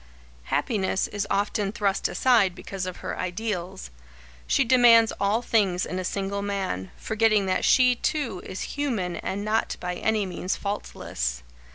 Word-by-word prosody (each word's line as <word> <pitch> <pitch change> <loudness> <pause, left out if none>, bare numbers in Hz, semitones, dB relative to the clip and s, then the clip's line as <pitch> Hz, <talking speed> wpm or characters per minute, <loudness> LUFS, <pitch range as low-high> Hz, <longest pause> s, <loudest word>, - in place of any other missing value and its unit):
Happiness 190 - 0
is 205 0 -3
often 200 0 0
thrust 205 -3 0
aside 225 -8 +3
because 195 -1 -5
of 185 - -6
her - - -4
ideals. 185 - -4 0.6
She 275 - +3
demands 235 -2 +6
all 210 +4 +1
things 195 -6 +1
in 185 - -4
a - - -3
single 200 +2 -2
man, 195 - -3
forgetting 220 -2 +2
that 185 - 0
she, 250 -1 +5
too, 240 -7 -2
is 185 - -6
human 225 -12 -2
and 200 +2 -4
not 220 +1 0
by 180 0 -3
any 215 +3 0
means 185 +1 -3
faultless. - - -4
200 Hz, 150 wpm, -25 LUFS, 185-225 Hz, 0.6 s, demands